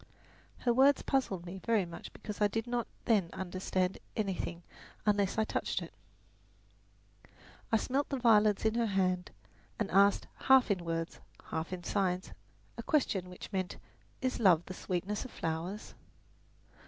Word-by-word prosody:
Her 240 - +3
words 270 +3 +5
puzzled 200 -10 0
me 185 +2 -7
very 220 -5 +2
much 170 -1 -9
because 210 0 -8
I 210 - +6
did 225 +2 -2
not 240 -1 -1 0.2
then 205 -7 +3
understand 185 0 -1 0.2
anything 185 -4 -2 0.4
unless 205 -2 +2
I 220 - +4
touched - - -1
it. - - -8 1.8
I 225 - +5
smelt 270 +5 -1
the 275 - -1
violets 215 -4 +4
in 220 - +3
her 235 0 +1
hand 185 -2 +1 0.5
and 210 -4 -2
asked, 200 +1 +5 0.2
half 265 -4 +7
in 185 -3 0
words, 165 0 -3 0.3
half 160 +2 -2
in 180 -1 -5
signs, 185 -1 0 0.5
a - - -1
question 200 - +1
which 180 +3 -10
meant, 185 -1 -2 0.5
"Is 255 - 0
love 180 -6 +5
the 185 - -6
sweetness 185 +3 -2
of 260 - -8
flowers?" 170 +3 -4
200 Hz, 150 wpm, -32 LUFS, 180-225 Hz, 1.8 s, half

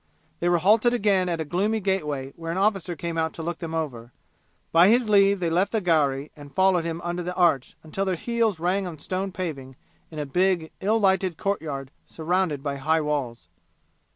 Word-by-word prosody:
They 175 - +1
were 175 - +4
halted 215 +7 +4
again 195 -5 +2
at 170 -1 -1
a 160 - -2
gloomy 205 +8 0
gateway 150 -9 -2
where 165 0 -5
an 170 - -3
officer 195 -3 0
came 170 0 -3
out 160 0 -1
to 165 - -7
look 170 +1 -4
them 165 -1 -5
over; 125 -7 -4 0.6
by 170 +2 +6
his 235 +1 +3
leave 200 -1 +5
they 170 -2 -1
left 180 +4 +1
the 225 - +1
gharry 150 -6 +1
and 145 -2 -13
followed 190 -2 +3
him 165 0 -3
under 175 +1 -3
the 180 +1 -4
arch 165 -8 +2
until 175 +5 -3
their 190 -1 0
heels 230 0 0
rang 185 +3 0
on 165 -3 -7
stone 185 +5 -3
paving 140 -8 -5 0.3
in 155 - -11
a 150 - -2
big 175 +2 +1
ill 215 +3 +2
lighted 190 -4 +2
courtyard 150 -9 -3 0.2
surrounded 165 -3 -1
by 140 -2 -2
high 160 +4 +1
walls. 130 - -3
175 Hz, 200 wpm, -25 LUFS, 155-190 Hz, 0.6 s, by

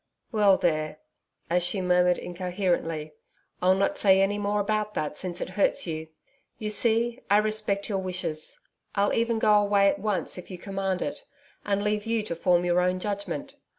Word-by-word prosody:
Well 205 -4 +4
there' 155 -3 0 0.5
as 175 +1 +2
she 190 +3 0
murmured 180 -1 +3
incoherently, 175 -4 -2 0.5
'I'll 185 +1 +4
not 195 - 0
say 190 -2 +5
any 200 +1 +2
more 205 0 0
about 210 +1 -1
that 150 0 -2
since 180 +1 -5
it - - -4
hurts 190 +2 +1
you. 160 -2 -4 0.5
You 215 -1 -3
see, 235 +3 +2
I 205 - +6
respect 210 -2 0
your 200 -3 -1
wishes. 180 -4 -4 0.4
I'll 200 0 +2
even 230 0 +1
go 215 -1 +4
away 200 -1 +4
at 200 - -2
once, 205 -3 -2
if 180 - -11
you 185 - -7
command 195 0 -2
it, - - -5 0.4
and 200 0 0
leave 210 +1 -1
you 225 -1 0
to 170 - -4
form 175 +1 +2
your 175 0 +3
own 180 0 +1
judgment. 210 +9 -4
195 Hz, 180 wpm, -27 LUFS, 180-210 Hz, 0.5 s, I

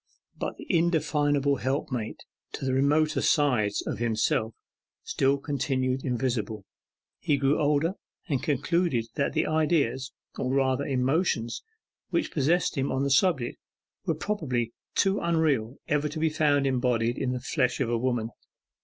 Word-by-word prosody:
But - - -4
the - - -9
indefinable 150 -5 +2
helpmate 130 -4 -3 0.3
to - - -4
the 130 - 0
remoter 145 +4 +2
sides 120 -9 +2
of - - -3
himself 110 -1 0 0.5
still 135 +1 +1
continued 135 -2 -1
invisible. 120 -5 -2 0.5
He 145 - +1
grew 140 +1 +2
older, 150 +4 +2 0.3
and 140 -7 0
concluded 150 -3 +1
that 140 -2 -1
the - - +1
ideas, 145 -5 +1 0.3
or 130 - -1
rather 135 0 +1
emotions, 130 -2 0 0.5
which 335 - 0
possessed 160 +1 +1
him 135 - 0
on 130 +1 0
the 140 - 0
subject, 135 -5 +2 0.5
were - - +1
probably 130 - -2 0.2
too 195 0 +2
unreal 150 -8 +1
ever 150 +1 +1
to 155 - -7
be 160 +1 +2
found 145 -2 +2
embodied 125 -3 +1
in 130 -2 0
the 125 - -2
flesh 125 -1 0
of 125 -4 0
a - - +2
woman. 120 -2 -1
135 Hz, 145 wpm, -27 LUFS, 125-150 Hz, 0.5 s, indefinable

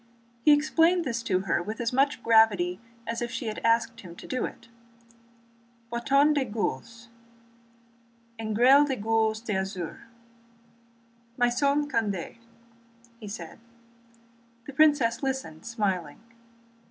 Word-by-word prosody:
He 300 - +5
explained 325 +4 +3
this 235 -3 -2
to 185 -5 0
her 175 -2 0
with 215 +6 -6
as 235 0 -2
much 275 -1 +1
gravity 205 -6 +3 0.3
as 230 +1 -4
if 240 - -2
she 245 - -5
had 215 -1 -4
asked 230 0 +1
him 175 -3 -11
to - - -12
do 255 - -2
it. 235 - -10 1.3
"Bâton 275 +5 +3
de 285 -2 +1
gueules, 230 +1 -4 1.3
engrêlé 245 +7 +4
de 270 - -1
gueules 220 0 0
d'azur—maison 235 - -4
Condé," 215 - -2 0.9
said 185 -4 -8
he. 230 - -29 1.0
The 280 - -9
princess 270 -6 +3
listened, 265 - -4
smiling. 190 -9 -2
230 Hz, 115 wpm, -27 LUFS, 215-260 Hz, 1.3 s, He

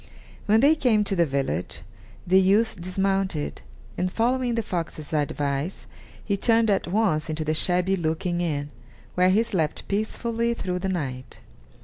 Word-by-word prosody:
When 215 +2 +5
they 285 +3 +6
came 245 -9 +2
to 195 - -1
the 170 -2 +3
village, 90 - -2 0.4
the 190 +1 +5
youth 205 +1 +2
dismounted, 190 -3 -1 0.4
and 180 0 0
following 245 +2 +1
the 230 - 0
fox's 165 -5 -5
advice, 145 +2 -2 0.4
he 200 - +1
turned 225 +1 +3
at 195 - 0
once 175 -6 +1
into 155 0 -3
the 155 - +1
shabby 180 +4 +1
looking 175 +1 -1
inn, 145 -4 -2 0.4
where 180 +1 +3
he 210 +5 +4
slept 165 -9 -2
peacefully 230 +3 -1
through 180 -4 -3
the 190 +1 -2
night. 130 -8 -4
185 Hz, 150 wpm, -25 LUFS, 155-215 Hz, 0.4 s, they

